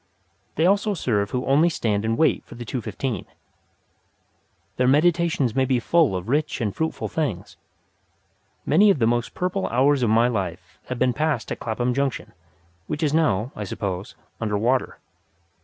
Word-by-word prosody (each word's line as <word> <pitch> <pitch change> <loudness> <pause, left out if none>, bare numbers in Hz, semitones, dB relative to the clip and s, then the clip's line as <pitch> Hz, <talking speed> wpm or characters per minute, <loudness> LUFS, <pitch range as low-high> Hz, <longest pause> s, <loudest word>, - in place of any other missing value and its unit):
They 160 - +2
also 205 +2 +2
serve 105 - 0
who 125 +2 -2
only 150 +5 +4
stand 110 -9 -1
and 115 +1 0
wait 160 - +2
for - - -13
the 120 0 -8
two 125 +2 -3
fifteen. 110 0 -4 1.5
Their 125 - +2
meditations 155 -3 +2
may 130 - +2
be 130 -1 +1
full 155 - +2
of 90 +2 -5
rich 150 +4 0
and 105 -5 -2
fruitful 160 0 -2
things. 145 - -3 1.1
Many 200 +8 +5
of 195 - +4
the 115 - +2
most 120 +1 0
purple 185 +1 -1
hours 135 +3 +2
of 120 - +2
my 115 +2 +4
life 95 -6 -4
have 130 - -4
been 125 0 +2
passed 150 -4 -1
at - - -4
Clapham 120 +2 -1
Junction, 140 0 -2 0.5
which 150 +1 -3
is 150 -2 +1
now, 125 -8 +1
I 105 - -4
suppose, 95 -1 -4 0.3
under 105 -2 0
water. 125 +5 0
125 Hz, 170 wpm, -23 LUFS, 110-155 Hz, 1.5 s, Many